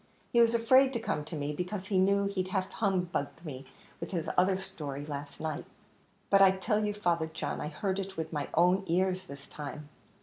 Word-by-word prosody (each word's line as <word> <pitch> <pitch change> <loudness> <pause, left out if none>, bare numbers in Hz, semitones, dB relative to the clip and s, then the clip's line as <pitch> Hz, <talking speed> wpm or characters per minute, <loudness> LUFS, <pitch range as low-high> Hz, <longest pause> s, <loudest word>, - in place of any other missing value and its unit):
He 235 - +6
was 230 0 +4
afraid 260 +4 +5
to 235 - -1
come 150 -9 -2
to 165 - -6
me, 145 0 -2
because 185 +4 -4
he 190 -1 +1
knew 200 +1 +3
he'd 195 -2 -1
half 190 0 -1
humbugged 180 -6 -1
me 135 -3 -7 0.3
with - - -5
his 170 -3 -2
other 185 +1 +4
story 150 -7 -6
last 145 -1 -6
night." 155 -2 -3 0.7
"But 195 - +6
I 195 - +9
tell 210 +3 0
you, 210 0 -1
Father 170 -6 +1
John, 160 -2 -4
I - - -2
heard 190 +5 -2
it 195 - -2
all 195 - -11
with 160 0 -4
my 145 -2 -2
own 180 +3 +4
ears 185 +2 +1
this 140 -1 -10
time." 150 0 -7
185 Hz, 210 wpm, -31 LUFS, 155-195 Hz, 0.7 s, I